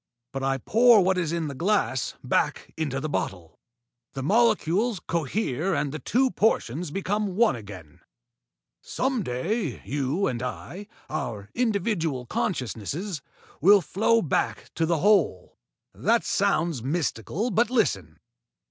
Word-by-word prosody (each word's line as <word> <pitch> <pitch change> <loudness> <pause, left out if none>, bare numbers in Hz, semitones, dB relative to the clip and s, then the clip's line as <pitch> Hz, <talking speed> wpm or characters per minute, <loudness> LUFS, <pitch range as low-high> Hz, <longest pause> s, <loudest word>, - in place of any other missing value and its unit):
But 135 - -4
I 135 0 +1
pour 225 - +5
what 185 0 +2
is 165 -3 -1
in 170 -2 -1
the 140 - -5
glass 170 - 0
back - - -1
into 140 -4 -2
the 155 - -3
bottle. 90 - -4 0.5
The 135 - -4
molecules 215 - +2
cohere 165 - -1
and 145 -2 -1
the 155 - -5
two 255 - +1
portions 170 - 0
become 195 +3 -2
one 225 - +4
again. 100 -9 -11 0.8
Some 260 -2 -1
day 165 - -2
you 145 +7 -1
and 120 -2 -2
I 180 +10 -6 0.2
our 110 -9 -5
individual 200 - 0
consciousnesses 170 - -3 0.4
will 200 +6 +7
flow 220 +6 +2
back 150 - -1
to 165 0 0
the 170 0 +2
Whole. 180 - +2 0.3
That - - +2
sounds 160 -6 +1
mystical, 160 - -2
but 225 +3 +2
listen. 95 - 0
170 Hz, 130 wpm, -26 LUFS, 135-210 Hz, 0.8 s, will